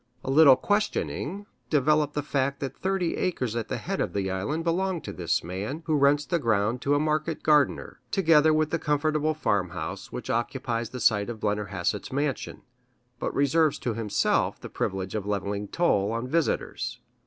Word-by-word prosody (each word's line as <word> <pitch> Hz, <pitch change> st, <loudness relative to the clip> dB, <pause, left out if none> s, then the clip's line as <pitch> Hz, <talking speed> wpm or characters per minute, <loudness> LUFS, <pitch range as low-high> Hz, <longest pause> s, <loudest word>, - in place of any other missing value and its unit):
A 135 Hz, -, -2 dB
little 140 Hz, -2 st, +8 dB
questioning 205 Hz, +2 st, -1 dB, 0.2 s
developed 150 Hz, 0 st, +2 dB
the 145 Hz, -, -1 dB
fact 140 Hz, -1 st, -1 dB
that 135 Hz, -, -4 dB
thirty 190 Hz, -3 st, -1 dB
acres 130 Hz, -11 st, -1 dB
at 115 Hz, -2 st, -2 dB
the -, -, -3 dB
head -, -, -3 dB
of -, -, -2 dB
the 95 Hz, -2 st, -1 dB
island 125 Hz, +13 st, -2 dB
belong 180 Hz, +2 st, 0 dB
to -, -, -7 dB
this 85 Hz, -2 st, -1 dB
man, 100 Hz, -, -5 dB
who 155 Hz, -, +1 dB
rents 145 Hz, +1 st, +3 dB
the 170 Hz, +3 st, 0 dB
ground 115 Hz, -1 st, +1 dB
to 145 Hz, +1 st, +2 dB
a -, -, +2 dB
market 155 Hz, +1 st, -1 dB
gardener, 150 Hz, -4 st, +2 dB
together 160 Hz, -3 st, +4 dB
with 155 Hz, 0 st, +1 dB
the 165 Hz, -, 0 dB
comfortable 155 Hz, +1 st, +1 dB
farmhouse 100 Hz, -, -2 dB
which -, -, -4 dB
occupies 120 Hz, -1 st, -2 dB
the 125 Hz, -, -7 dB
site 105 Hz, -3 st, +2 dB
of 115 Hz, -2 st, -6 dB
Blennerhassett's 105 Hz, -4 st, -2 dB
mansion, 140 Hz, 0 st, -2 dB, 0.6 s
but -, -, -2 dB
reserves 150 Hz, +2 st, +3 dB
to 120 Hz, -, -2 dB
himself 110 Hz, -2 st, 0 dB
the -, -, -8 dB
privilege 95 Hz, -1 st, -3 dB
of 105 Hz, -2 st, -3 dB
levying 100 Hz, 0 st, -2 dB
toll 105 Hz, -, +1 dB
on 115 Hz, +2 st, -3 dB
visitors. 165 Hz, +3 st, -1 dB
140 Hz, 175 wpm, -27 LUFS, 105-155 Hz, 0.6 s, little